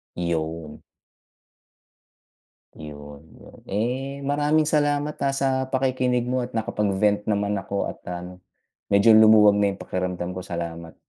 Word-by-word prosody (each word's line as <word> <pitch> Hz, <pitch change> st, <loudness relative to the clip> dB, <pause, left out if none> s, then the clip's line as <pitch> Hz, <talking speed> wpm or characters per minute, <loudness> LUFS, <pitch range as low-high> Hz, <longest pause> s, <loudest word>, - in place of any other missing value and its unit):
'Yun. 80 Hz, -2 st, -4 dB, 2.0 s
'Yun, 75 Hz, -1 st, -10 dB
'yun, -, -, -16 dB
eh, 130 Hz, +7 st, -3 dB
maraming 145 Hz, +2 st, +2 dB
salamat, 145 Hz, -1 st, 0 dB
ah, 135 Hz, -, 0 dB
sa 135 Hz, 0 st, 0 dB, 0.2 s
pakikinig 130 Hz, -2 st, 0 dB
mo 125 Hz, +1 st, -1 dB
at 125 Hz, -, -17 dB
nakapag-vent 105 Hz, -2 st, 0 dB
naman 100 Hz, -1 st, 0 dB
ako 100 Hz, +1 st, -3 dB
at -, -, -11 dB
ano 90 Hz, +1 st, -7 dB, 0.5 s
medyo 100 Hz, +3 st, +4 dB
lumuwag 110 Hz, -2 st, +7 dB
na 100 Hz, -1 st, +1 dB
'yung -, -, -16 dB
pakiramdam 90 Hz, -1 st, -3 dB
ko. 90 Hz, -, -6 dB
Salamat. 85 Hz, -2 st, -6 dB
105 Hz, 125 wpm, -24 LUFS, 90-130 Hz, 2.0 s, lumuwag